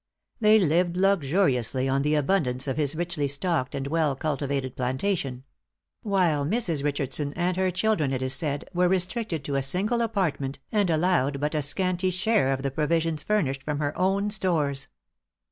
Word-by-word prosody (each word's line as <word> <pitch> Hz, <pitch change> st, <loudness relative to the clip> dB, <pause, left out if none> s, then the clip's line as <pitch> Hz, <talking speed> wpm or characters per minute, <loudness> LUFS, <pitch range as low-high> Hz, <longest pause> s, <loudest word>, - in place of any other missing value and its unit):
They 215 Hz, -1 st, +6 dB
lived 175 Hz, -1 st, +2 dB
luxuriously 145 Hz, -, +2 dB
on 135 Hz, +1 st, +1 dB
the 150 Hz, +2 st, +1 dB
abundance 140 Hz, -4 st, 0 dB
of 135 Hz, -, -1 dB
his 145 Hz, 0 st, 0 dB
richly 170 Hz, -3 st, -2 dB
stocked 140 Hz, -1 st, -1 dB
and 135 Hz, -1 st, -3 dB
well 150 Hz, -1 st, +1 dB
cultivated 140 Hz, -2 st, -2 dB
plantation; 130 Hz, 0 st, -2 dB, 0.6 s
while 180 Hz, -9 st, +1 dB
Mrs. 170 Hz, -, 0 dB
Richardson 145 Hz, 0 st, -2 dB
and 180 Hz, +1 st, 0 dB
her 185 Hz, 0 st, +1 dB
children, 180 Hz, -6 st, 0 dB
it 130 Hz, -1 st, -2 dB
is 130 Hz, 0 st, 0 dB
said, 145 Hz, -2 st, -2 dB
were 180 Hz, 0 st, +2 dB
restricted 185 Hz, -, 0 dB
to 140 Hz, 0 st, -2 dB
a -, -, +1 dB
single 195 Hz, -, 0 dB
apartment, 175 Hz, -11 st, -1 dB
and 205 Hz, -4 st, +2 dB
allowed 155 Hz, -4 st, +1 dB
but 150 Hz, +2 st, -1 dB
a 155 Hz, -, 0 dB
scanty 185 Hz, +5 st, 0 dB
share 190 Hz, -5 st, +2 dB
of 135 Hz, 0 st, -2 dB
the 140 Hz, -, -1 dB
provisions 160 Hz, +1 st, 0 dB
furnished 145 Hz, -11 st, 0 dB
from 150 Hz, +2 st, -3 dB
her 145 Hz, -1 st, -2 dB
own 195 Hz, +3 st, +1 dB
stores. 155 Hz, -9 st, 0 dB
155 Hz, 165 wpm, -26 LUFS, 140-185 Hz, 0.6 s, They